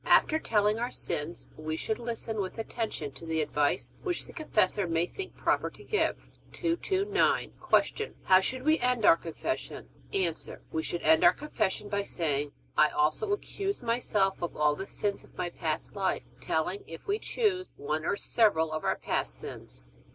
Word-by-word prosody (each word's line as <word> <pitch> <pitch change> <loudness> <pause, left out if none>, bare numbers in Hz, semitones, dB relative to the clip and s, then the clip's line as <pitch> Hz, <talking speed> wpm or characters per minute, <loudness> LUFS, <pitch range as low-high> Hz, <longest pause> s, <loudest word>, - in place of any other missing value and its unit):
After 315 - +5
telling 210 -4 +2
our 240 +1 -1
sins 155 -5 -3
we 155 0 -3
should 220 +7 -2
listen 230 -2 -2
with 190 +3 -5
attention 220 -9 -3
to 135 +5 -11
the 160 0 0
advice 150 -1 +1
which 360 -3 -1
the - - -12
confessor 210 - +1
may 165 0 +2
think 380 - -7
proper - - +1
to - - -15
give. 425 - +1 0.4
229. 380 +4 +1 0.4
Q. 440 - -5
How 185 0 +6
should 255 +6 -2
we 310 +2 +4
end 250 -3 +2
our - - +9
Confession? 165 - -4 0.2
A. 180 -4 +2 0.4
We 160 - 0
should 170 +2 -3
end 160 +1 +5
our 175 - +8
Confession 215 -8 -1
by 200 0 0
saying, 145 -7 -1 0.2
I 150 - +6
also 155 - +1
accuse 400 -4 -2
myself 215 -5 +1
of 175 - -3
all 150 -1 +4
the 195 +6 -5
sins 205 -1 -2
of - - -20
my 175 - -2
past 160 +3 -3
life, 195 -2 0 0.2
telling, 170 +5 -1
if 165 0 -9
we 410 +2 0
choose, 395 -7 0
one 155 +2 -2
or 185 - +1
several 160 -11 +3
of 155 0 -3
our - - +1
past - - -1
sins. - - -7
195 Hz, 175 wpm, -30 LUFS, 160-250 Hz, 0.4 s, our